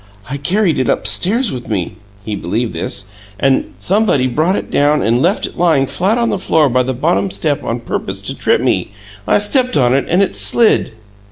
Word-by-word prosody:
"I 140 - -2
carried 175 +4 0
it 130 - 0
upstairs 190 - +1
with 125 -2 -7
me" 95 -4 -3 0.3
he 110 - -3
believed 110 +6 -3
this 100 - -4 0.3
"and 135 -1 +1
somebody 190 -9 +1
brought 155 +9 +1
it - - -5
down 145 0 +2
and 120 +3 +1
left 180 +7 +1
it - - -9
lying 160 -6 +3
flat 180 - 0
on 235 -1 +1
the 200 - -2
floor 160 -5 +2
by 125 +1 +2
the 130 0 -2
bottom 170 +8 0
step 150 -5 -2
on 120 +1 -3
purpose 95 -4 -4
to - - -2
trip - - +1
me! - - -1 0.3
I - - +4
stepped 250 - +1
on 125 -3 +3
it 135 - +1
and 180 +4 +3
it 195 - -2
slid." 230 - +2
145 Hz, 200 wpm, -15 LUFS, 120-190 Hz, 0.3 s, I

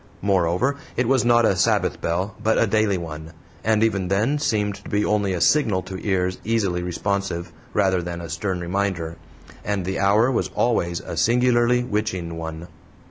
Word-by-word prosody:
Moreover, 100 +7 +1 0.2
it 125 -1 +1
was 130 -1 +3
not 120 -1 +4
a 100 - +3
"Sabbath" 90 - +1
bell, 90 +5 -1
but 110 0 +2
a - - +4
DAILY 110 -2 +1
one, 80 -1 -7 0.3
and 110 0 +2
even 100 -5 +1
then 110 +10 +1
seemed 105 -8 0
to - - -12
be 105 +1 +1
only 105 -2 +1
a 90 - -2
signal 105 - +3
to 95 -1 -7
ears 95 -2 0
easily 100 -6 0
responsive, 90 0 -3 0.2
rather 95 -2 +2
than 85 0 -5
a 85 - -6
stern 90 +3 -3
reminder. 85 -2 -2 0.5
And 100 -3 -2
the 95 +1 -2
hour 105 +6 +3
was 120 - 0
always 85 -8 +1
a - - -7
singularly 120 +5 +3
witching 105 -7 -2
one. 80 +1 -6
100 Hz, 175 wpm, -23 LUFS, 90-110 Hz, 0.5 s, not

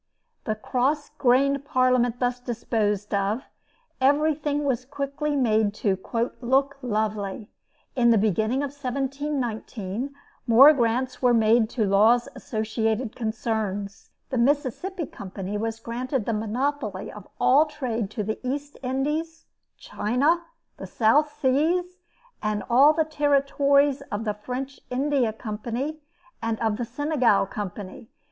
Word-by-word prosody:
The 215 - -1
cross 265 +7 -1
grained 275 +2 +3
Parliament 255 -3 +2
thus 245 0 0
disposed 220 -4 -2
of, 200 +5 0 0.6
everything 295 +1 +2
was 255 -3 0
quickly 280 +2 -3
made 220 -5 +2
to 200 -2 +1 0.5
"look 270 +3 +1
lovely." 210 -3 -2 0.4
In 240 -2 +4
the 230 - +5
beginning 220 +6 +1
of 280 - -3
1719, 265 -5 -3 0.4
more 265 +6 +9
grants 250 0 0
were 245 -2 +4
made 220 0 +4
to 225 -4 0
Law's 220 +5 +4
associated 220 0 -2
concerns. 220 -3 -3 0.2
The 255 - 0
Mississippi 290 - 0
Company 195 -3 -7
was 225 +1 -3
granted 245 +1 -3
the 230 - -1
monopoly 250 +7 -2
of - - -11
all 290 +5 +5
trade 240 -8 -3
to 215 0 -4
the 215 +2 -3
East 285 +3 -4
Indies, 300 +5 -2 0.3
China, 280 +11 +1 0.4
the - - -7
South 285 +7 +3
Seas, 345 +7 +1 0.4
and 215 -1 -1
all 275 +5 +7
the 320 0 +1
territories 280 -1 +2
of 205 +2 -2
the 210 - 0
French 255 +6 -6
India 265 -2 +1
Company, 235 +7 -4 0.4
and 230 -1 -2
of 220 -2 0
the 240 - -2
Senegal 255 -4 +2
Company. 205 +1 -7
250 Hz, 125 wpm, -25 LUFS, 220-280 Hz, 0.6 s, more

